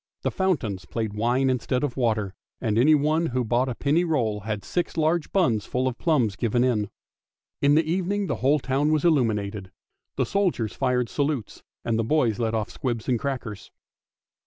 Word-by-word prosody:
The - - 0
fountains 115 - -1
played 110 0 -3
wine 120 +5 +1
instead 125 0 0
of 140 -5 -2
water, 110 -6 0 0.3
and 110 -4 -1
anyone 155 +4 +3
who 125 -2 -1
bought 120 +3 +1
a 125 - -3
penny 150 +7 +2
roll 120 -11 0
had 105 -1 -4
six 175 - -2
large 160 0 +1
buns 120 - +1
full 130 +1 0
of 130 - -3
plums 125 - +1
given 120 +2 +1
in. 110 -5 +1 0.7
In 145 +1 +4
the 160 - +4
evening 190 +4 0
the - - -2
whole 140 +4 +3
town 140 +2 0
was 155 +1 +1
illuminated. 105 - +1 0.4
The - - +1
soldiers 180 - 0
fired 125 -2 0
salutes, 140 -6 -2 0.2
and 115 -1 0
the - - +1
boys 120 -3 +1
let 115 -1 0
off 110 -2 -2
squibs 120 -4 -3
and 125 -3 +1
crackers. 125 -7 -5
125 Hz, 180 wpm, -25 LUFS, 110-150 Hz, 0.7 s, In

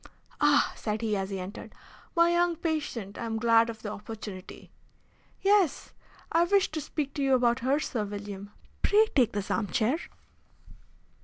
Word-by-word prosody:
"Ah," 295 -1 +4
said 215 0 -3
he, 215 -2 +1
as 195 -1 -2
he 195 -1 -4
entered. 185 +4 -8 0.4
"My 340 0 +5
young 345 0 +2
patient! 300 - -3
I 235 - -3
am 225 0 -2
glad 230 0 +4
of 225 -1 -8
the 210 - -4
opportunity." 210 -3 -9 0.7
"Yes, 395 -7 +2 0.4
I 335 - +4
wish 395 +1 +2
to 310 0 -3
speak 285 -1 -4
to 285 - -3
you 270 -1 +4
about 245 0 +2
her, 265 +4 +1
Sir 235 -8 -2
William. 205 -1 -7 0.3
Pray 425 +2 +5
take 245 -5 +4
this 205 -1 -3
arm 215 - 0
chair." 225 - +1
235 Hz, 165 wpm, -28 LUFS, 210-310 Hz, 0.7 s, My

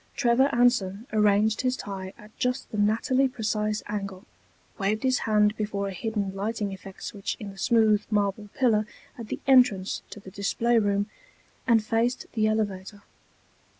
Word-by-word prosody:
Trevor 255 +2 +3
Anson 235 -5 +2
arranged 210 0 +3
his 255 0 0
tie 190 -2 -6
at 210 +1 -16
just 250 +1 -1
the 215 - -4
nattily 230 +6 +2
precise 215 -3 -2
angle, 195 -2 -5 0.5
waved 210 +3 0
his 260 -1 +2
hand 210 0 +3
before 205 -2 -2
a - - -6
hidden 205 -1 -3
lighting 205 0 -3
effect 190 0 -11
switch 200 -3 -4
in 205 -2 -7
the 195 - -15
smooth 220 -2 +3
marble 205 0 0
pillar 220 -5 +2 0.3
at 230 -3 -8
the - - -4
entrance 245 -8 +4
to - - -9
the 190 -1 -12
display 230 +4 +1
room, 205 -1 +1 0.6
and 230 -3 +4
faced 230 +3 0
the 215 -2 +2
elevator. 205 -2 -2
215 Hz, 155 wpm, -26 LUFS, 200-230 Hz, 0.6 s, entrance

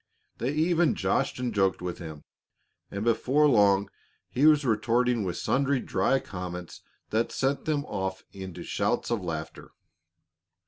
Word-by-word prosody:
They 125 - 0
even 165 +2 +2
joshed 135 - 0
and 125 -2 -2
joked 95 -2 +2
with 90 -1 -5
him, 80 -3 -8 0.7
and 100 +1 -4
before 130 +6 +3
long 100 -6 +4 0.4
he 140 +5 +4
was 150 -2 +5
retorting 120 +1 +2
with 90 -2 -3
sundry 140 0 +1
dry 135 - +1
comments 90 -4 -7 0.3
that 115 +2 +1
sent 135 +1 -1
them 150 -2 0
off 95 -4 -4
into 95 -3 -8
shouts - - -1
of 115 -4 0
laughter. 80 -3 -5
115 Hz, 140 wpm, -27 LUFS, 95-135 Hz, 0.7 s, was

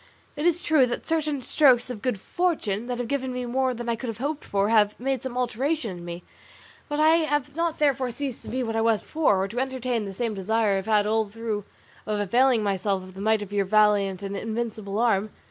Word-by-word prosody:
It 300 +3 0
is 345 0 +1
true 295 -5 +4
that 240 - -4
certain 305 -4 0
strokes 255 -3 +4
of 220 -4 -7
good 250 -5 -1
fortune, 240 - -1
that 245 -1 -2
have 245 -1 -3
given 265 0 -2
me 250 0 -3
more 260 +2 0
than 240 -1 -6
I 235 - +1
could 245 +3 -6
have 225 -2 -4
hoped 285 +5 -3
for, 200 +1 0
have 210 -2 +3
made 265 0 -1
some 255 -1 -5
alteration 250 - -1
in 175 - -10
me; 175 0 -7 0.7
but 295 0 -2
I 315 +2 +6
have 295 -3 -1
not 335 -1 -1
therefore 270 -4 +1
ceased 255 +1 -5
to - - -9
be 255 +1 -1
what 225 -1 -3
I 225 - +2
was 225 -1 +2
before, 205 -12 +2
or - - -1
to 230 +5 -4
entertain 255 -4 -1
the 195 - -6
same 230 +1 -1
desire 215 +2 +1
I - - +2
have 195 - -4
had 210 -2 +3
all 220 0 +1
through 215 -1 -4 0.4
of 210 -1 -1
availing 235 +3 +3
myself 195 -1 0
of 185 0 -12
the 190 - -8
might 220 0 +2
of 205 0 -10
your 200 -1 +1
valiant 200 -2 +3
and 200 0 -4
invincible 220 -2 -3
arm. 215 -3 +2
230 Hz, 235 wpm, -25 LUFS, 205-265 Hz, 0.7 s, I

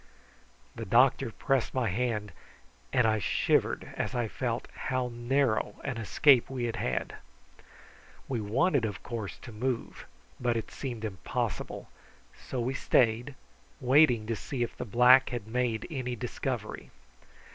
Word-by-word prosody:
The - - -6
doctor 125 +4 +4
pressed 135 +3 -1
my 130 -3 +1
hand, 105 0 -1 0.6
and 125 - +3
I 110 -1 +3
shivered 90 - +1
as - - -3
I 120 -2 0
felt 120 +1 -3
how 130 -1 -2
narrow 120 0 +1
an 135 -4 -3
escape 120 +3 +4
we 130 -2 -3
had 115 -1 -2
had. 65 - -2 1.1
We 125 -4 -2
wanted, 135 - +2
of 105 -2 -3
course, 115 -5 -5
to 120 - -9
move, 120 +2 -3 0.3
but 120 -2 +1
it 115 - -5
seemed 120 -5 -5
impossible, 95 -4 -4 0.5
and - - -20
so 130 - -2
we 125 +3 -1
stayed, 120 +1 +2 0.4
waiting 130 -3 +4
to 115 +1 -1
see 120 +3 -3
if 120 - -4
the - - -5
black 125 +4 +6
had 120 -5 -4
made 120 -1 -1
any 125 -4 -3
discovery. 110 - -4
120 Hz, 145 wpm, -29 LUFS, 110-130 Hz, 1.1 s, black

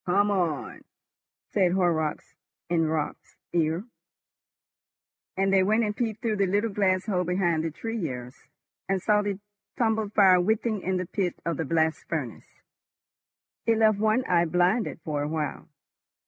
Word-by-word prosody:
"Come 200 +3 +3
on," 175 -7 -2 0.7
said 185 -3 +3
Horrocks 165 -5 0 0.4
in 165 -2 +2
Raut's 155 -1 -4 0.2
ear, 165 +3 0 1.5
and 195 0 +2
they 190 - +5
went 215 +4 +2
and 210 -1 -1
peeped 220 -2 -3
through 220 -2 0
the 200 -1 +2
little 205 +4 0
glass 190 -2 +1
hole 185 -4 0
behind 175 -2 0
the 165 - -1
tuyeres, 150 - -6 0.4
and 195 0 +1
saw 210 +2 +2
the 200 -2 -3 0.4
tumbled 220 -4 0
fire 185 -3 +6
writhing 220 +2 0
in 185 0 -1
the 180 - -2
pit 180 0 -2
of 165 -3 -1
the 160 - -2
blast 160 +1 0
furnace. 140 -9 -4 1.2
It 225 -1 +4
left 215 -2 +4
one 220 +4 +2
eye 175 -1 +3
blinded 180 +7 +1
for 150 -2 -2
a 145 - -1
while. 155 +1 -4
185 Hz, 150 wpm, -26 LUFS, 165-210 Hz, 1.5 s, fire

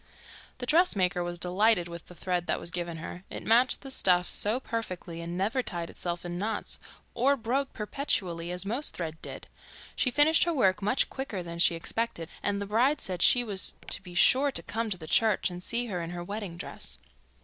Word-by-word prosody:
The 250 - -4
dressmaker 200 - +3
was 175 0 -3
delighted 180 +1 +3
with 170 -1 -9
the 180 - -13
thread 180 -1 -2
that - - 0
was 170 - -4
given 170 -1 -3
her. 175 +3 -7
It - - -6
matched 235 +3 +4
the 270 - -8
stuffs 180 -7 +3
so 215 +5 0
perfectly, 185 -9 -5
and 170 +1 -5
never 220 +8 +1
tied 175 -7 -5
itself 175 0 -4
in 175 0 -4
knots, 210 +1 -1 0.3
or 275 +4 +3
broke 260 +4 -1
perpetually, 190 - -2
as 180 +2 0
most 240 +9 +3
thread 160 -2 -5
did. - - -6 0.5
She 255 - +2
finished 295 +6 +5
her 340 - +1
work 190 -7 +3
much 210 +6 +2
quicker 245 -9 -4
than 170 0 -7
she 170 - +5
expected 170 -1 -2
and 205 -1 0
the 200 - -3
bride 245 +9 +2
said 180 -2 -3
she 245 - +6
was 200 -5 -2 0.2
to - - -1
be 180 -2 -11
sure 265 +10 +5
to - - -4
come 225 0 -2
to 190 - -1
the 160 - -9
church 210 +3 +2
and 175 0 -7
see 235 +4 0
her 185 -7 -3
in 165 - -5
her 175 0 -5
wedding 200 -2 -5
dress. 185 - -6
195 Hz, 205 wpm, -29 LUFS, 175-235 Hz, 0.5 s, she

